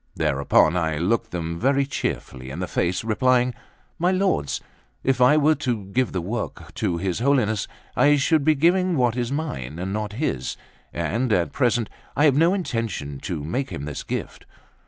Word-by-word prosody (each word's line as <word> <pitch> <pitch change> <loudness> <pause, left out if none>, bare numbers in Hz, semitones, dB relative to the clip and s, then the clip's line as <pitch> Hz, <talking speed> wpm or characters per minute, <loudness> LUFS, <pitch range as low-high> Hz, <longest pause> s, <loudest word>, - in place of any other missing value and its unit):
Thereupon 70 +4 +3
I 80 -3 0
looked 115 +7 0
them 85 -3 -4
very 140 +2 +2
cheerfully 65 - -4
in 70 - -6
the 95 - -2
face, 90 +3 0
replying: 125 +3 +2 0.5
"My 175 +2 +3
lords, 185 - +1 0.4
if 130 -1 +1
I 130 +5 +6
were 155 +1 +5
to 125 -9 -2
give 130 +3 +1
the 90 - -2
work 110 +6 -5
to 85 - -1
his 95 +2 -2
Holiness, 115 -6 +2 0.3
I 145 0 +5
should 145 +2 +2
be 155 +1 +4
giving 175 +3 +3
what 120 -3 +2
is 120 0 -2
mine 85 - -4
and 95 +2 -3
not 105 -1 -3
his, 105 - -2 0.3
and 120 +3 -1
at 90 -4 +2
present 120 -3 +1 0.3
I 145 - +4
have 140 -3 +5
no 165 +6 +4
intention 115 - -3
to 80 -2 -4
make 130 - -2
him 70 - -5
this 75 -2 -5
gift. - - -5
115 Hz, 175 wpm, -24 LUFS, 85-140 Hz, 0.5 s, I